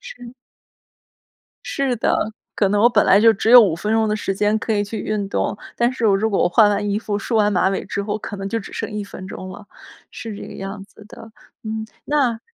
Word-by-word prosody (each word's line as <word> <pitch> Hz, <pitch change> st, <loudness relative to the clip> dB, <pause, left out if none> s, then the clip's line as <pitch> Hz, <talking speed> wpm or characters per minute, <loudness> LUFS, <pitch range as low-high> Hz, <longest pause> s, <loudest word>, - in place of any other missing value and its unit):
是。 255 Hz, -, -11 dB, 1.3 s
是 270 Hz, -3 st, -1 dB
的， -, -, +1 dB, 0.4 s
可 200 Hz, -, +2 dB
能 205 Hz, 0 st, +2 dB
我 235 Hz, -, +6 dB
本 -, -, +3 dB
来 200 Hz, -, +6 dB
就 225 Hz, 0 st, +6 dB
只 220 Hz, -, -1 dB
有 245 Hz, -1 st, +11 dB
5 185 Hz, -7 st, +2 dB
分 210 Hz, +6 st, -3 dB
钟 220 Hz, -1 st, +2 dB
的 210 Hz, -, 0 dB
时 195 Hz, -2 st, -2 dB
间 210 Hz, +2 st, +1 dB
可 220 Hz, -, -2 dB
以 205 Hz, 0 st, +1 dB
去 215 Hz, +2 st, -6 dB
运 210 Hz, -2 st, -2 dB
动， 205 Hz, -, -1 dB, 0.2 s
但 240 Hz, +1 st, +1 dB
是 235 Hz, -3 st, -2 dB
我 195 Hz, -, +4 dB
如 220 Hz, +3 st, 0 dB
果 195 Hz, -, +1 dB
我 -, -, +4 dB
换 210 Hz, +2 st, +5 dB
完 205 Hz, 0 st, -1 dB
衣 205 Hz, -, 0 dB
服， 205 Hz, -2 st, -3 dB
梳 230 Hz, -, -3 dB
完 210 Hz, -1 st, +3 dB
马 190 Hz, 0 st, +2 dB
尾 195 Hz, -, -2 dB
之 200 Hz, -, -3 dB
后， 210 Hz, +1 st, -2 dB
可 205 Hz, -1 st, -7 dB
能 195 Hz, 0 st, -4 dB
就 225 Hz, +3 st, -2 dB
只 195 Hz, -, -11 dB
剩 -, -, -5 dB
1 210 Hz, -1 st, -4 dB
分 185 Hz, -1 st, -10 dB
钟 185 Hz, -1 st, -8 dB
了， 205 Hz, +2 st, -11 dB, 0.5 s
是 220 Hz, -3 st, -7 dB
这 -, -, -8 dB
个 -, -, -10 dB
样 195 Hz, +1 st, -7 dB
子 210 Hz, +1 st, -17 dB
的。 225 Hz, 0 st, -13 dB, 0.3 s
嗯， 220 Hz, 0 st, -4 dB, 0.2 s
那 265 Hz, -6 st, +1 dB
210 Hz, 255 characters per minute, -20 LUFS, 200-225 Hz, 1.3 s, 有